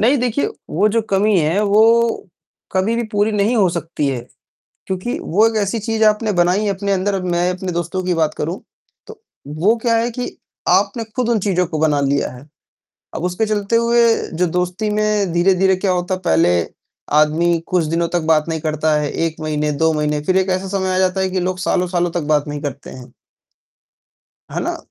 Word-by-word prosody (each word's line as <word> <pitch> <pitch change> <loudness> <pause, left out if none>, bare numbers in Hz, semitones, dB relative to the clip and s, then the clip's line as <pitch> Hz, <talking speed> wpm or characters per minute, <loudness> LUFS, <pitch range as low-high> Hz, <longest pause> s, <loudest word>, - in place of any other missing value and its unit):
नहीं 250 +7 +4
देखिए, 250 - 0 0.2
वो 200 +7 +2
जो 225 +1 +1
कमी 200 0 +3
है, 165 +7 +1
वो 225 +1 +3 0.4
कभी 190 +5 +1
भी 235 - 0
पूरी 205 +1 +1
नहीं 210 +4 +1
हो 195 -4 +4
सकती 165 -3 -3
है। 130 -3 -2 0.7
क्योंकि 190 +6 -3
वो 210 +7 +2
एक 225 - -3
ऐसी 200 +3 -1
चीज़ 220 +1 -1
आपने 215 0 +2
बनाई 180 +4 +2
अपने 200 +1 -2
अंदर, 195 +2 0
अब 190 -1 -2
मैं 175 +1 +1
अपने 185 0 -5
दोस्तों 175 +2 -3
की 180 -1 0
बात 155 -2 0
करूँ, 170 +6 -3 0.5
तो 445 -1 -12 0.3
वो 165 +10 +1
क्या 230 -1 +2
है 235 +1 0
कि 245 +1 -6 0.3
आपने 200 +5 +2
खुद 245 -2 0
उन 230 - +2
चीज़ों 180 -2 +1
को 155 -2 -4
बना 150 -2 +2
लिया 140 -1 0
है, 125 +4 -13 0.7
अब 170 - -4
उसके 180 +5 0
चलते 210 +1 0
हुए 235 0 +3 0.3
जो 180 - +3
दोस्ती 180 +5 -2
में 210 -3 0
धीरे-धीरे 190 +2 +3
क्या 185 0 0
होता 180 +1 -1
है, 185 - -6
पहले 85 - +3 0.5
आदमी 160 +3 +3
कुछ 180 -3 +1
दिनों 165 +2 -1
तक 175 0 0
बात 155 +1 +1
नहीं 160 -1 -2
करता 155 0 0
है, 145 -1 -2
1 165 -1 -2
महीने, 150 -1 -1
2 160 +2 +1
महीने, 150 0 0
फिर 185 +3 +1
एक 190 0 0
ऐसा 190 0 -7
समय 190 -1 -1
आ - - +1
जाता 185 0 +1
है 190 0 0
कि 185 0 -1
लोग 180 +1 -2
सालों-सालों 180 -2 0
तक 170 -1 -2
बात 145 0 0
नहीं 145 0 -4
करते 140 -1 -6
हैं। 125 -1 -12 1.4
है - - -2
ना? - - -2
185 Hz, 200 wpm, -18 LUFS, 165-210 Hz, 1.4 s, नहीं